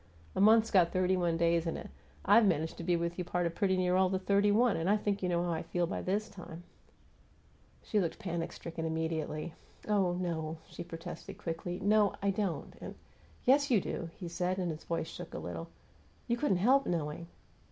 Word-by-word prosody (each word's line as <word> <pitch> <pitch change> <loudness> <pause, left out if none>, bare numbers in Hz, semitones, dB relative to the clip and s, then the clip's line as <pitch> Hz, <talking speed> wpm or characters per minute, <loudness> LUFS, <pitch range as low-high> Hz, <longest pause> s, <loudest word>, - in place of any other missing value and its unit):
A - - +1
month's 220 +2 +6
got 175 -3 +5
thirty 185 0 +2
one 175 -2 +1
days 170 0 +2
in 165 - -2
it; - - -9 0.3
I've 230 - +7
managed 160 -3 0
to - - -6
be 175 +1 +2
with 170 +1 -2
you - - +1
a 175 - -7
part 175 0 0
of 170 - -1
pretty 190 +1 +1
near 180 0 +2
all 190 0 +4
the 190 - 0
thirty 200 +2 +2
one, 230 +2 +4
and 165 +3 -1
I 210 - +5
think 205 -1 -1
you 180 - 0
know 175 0 +1
how 175 - -1
I 160 - -1
feel 175 -1 -1
by - - -3
this 205 +3 -1
time 175 -2 -10 0.6
" - - -32
She 215 - +1
looked 170 -4 -1
panic 170 -5 -3
stricken 165 -1 -6
immediately. 160 0 -2 0.3
"Oh, 195 -4 +2
no," 165 -3 -3
she - - -7
protested, 170 0 -8
quickly. 175 +2 -4
"No, 205 0 +3
I 200 0 +1
don't, 195 -3 -2
and - - -7 0.3
" - - -28
"Yes, 285 +3 +4
you 235 -5 +5
do," 175 -2 -4
he 180 - -6
said, 180 +2 -1
and 180 -3 -1
his 155 - -8
voice 165 -1 -1
shook - - -8
a - - -3
little. 85 -1 -5 0.6
"You 235 - +2
couldn't 240 -6 +1
help 260 +9 +4
knowing." 165 0 -2
175 Hz, 220 wpm, -32 LUFS, 165-200 Hz, 0.6 s, I've